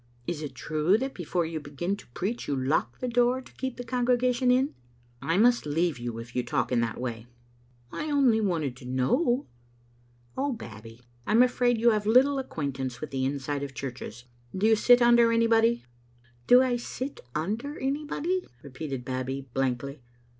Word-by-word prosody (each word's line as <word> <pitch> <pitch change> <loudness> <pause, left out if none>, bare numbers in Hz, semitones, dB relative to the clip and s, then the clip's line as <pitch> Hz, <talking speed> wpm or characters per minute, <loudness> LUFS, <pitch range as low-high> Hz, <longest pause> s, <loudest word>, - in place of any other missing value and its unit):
Is 160 0 -3
it 140 -4 -6
true 155 - +1
that 265 +3 -3
before 175 0 -1
you 160 0 -4
begin 150 +6 -3
to - - -14
preach 220 +6 -3
you 140 - 0
lock 130 -3 0
the 255 - -3
door 245 +1 +2
to 260 - -14
keep 260 -1 -4
the 245 - -5
congregation 250 +1 +1
In?" 260 +3 +3 0.3
" 120 0 -34
I 165 +2 0
must 240 -4 +4
leave 160 -2 0
you 120 -1 -4
if 115 +1 -9
you 125 - +2
talk 120 +1 -1
in 120 -2 +2
that 115 -1 -2
way." 120 -2 -5 0.3
" - - -34 0.3
I 305 - -4
only 265 -6 +3
wanted 160 - -1
to 125 - -12
know." 240 - +1 0.9
"Oh, 275 0 0
Babbie, 115 - -10 0.3
I - - +1
am 235 +3 +7
afraid 245 -1 +2
you 235 +1 +4
have 210 -1 0
little 270 +5 +5
acquaint 145 - -4
ance 130 -2 -4
with 155 - -6
the 130 -1 -1
inside 140 +1 -2
of 140 -1 -6
churches. 125 -2 -7 0.3
Do 195 - +1
you 220 0 +6
sit 245 +3 +5
tmder 235 -1 +6
anybody?" 230 +1 +3 0.3
" 120 0 -32
Do 250 +1 +7
I 250 -2 +1
sit 255 +3 -6 0.2
under 220 - -2
anybody?" 300 +6 -1 0.2
repeated 135 -2 -6
Babbie, 130 +1 -4
blankly. 135 +1 -2
175 Hz, 190 wpm, -27 LUFS, -, 0.9 s, am